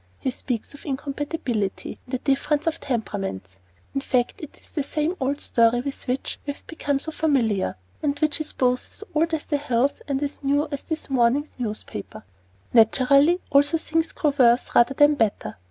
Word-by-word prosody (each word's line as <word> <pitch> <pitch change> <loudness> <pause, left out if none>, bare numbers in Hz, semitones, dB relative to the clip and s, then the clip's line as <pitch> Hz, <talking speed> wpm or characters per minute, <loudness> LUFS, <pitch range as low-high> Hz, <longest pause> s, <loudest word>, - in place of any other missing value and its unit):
He 260 - -2
speaks 245 -1 -4
of 285 - -12
"incompatibility," 270 - -3
and 255 - -3
a - - +1
"difference 285 +3 0
of 330 0 0
temperaments." 195 - -4 0.3
In 275 - -1
fact, 250 -3 0
it 305 - -9
is - - -21
the 300 - -1
same 305 +5 -1
old 275 +2 -1
story 235 +1 +3
with 275 +1 -6
which 255 +2 -2
we 285 - -1
have - - -20
become 290 -3 -1
so 320 +4 -4
familiar, 235 - +1 0.3
and 285 -1 0
which 305 +1 +1
is 310 - -4
both 250 -1 0
as - - -9
old 325 +2 +2
as 305 - -6
the 290 - 0
hills 275 -1 0
and 280 0 -1
as 285 0 -4
new 285 +2 +2
as 285 - -3
this 320 -2 -4
morning's 260 +4 +2
newspaper. 215 - -5 0.5
Naturally, 275 +9 +5
also, 285 +3 +5
things 325 +1 0
grow 300 -6 0
worse, 240 0 +4
rather 240 +3 +4
than 290 +1 +6
better. 225 - -1
275 Hz, 185 wpm, -24 LUFS, 245-295 Hz, 0.5 s, than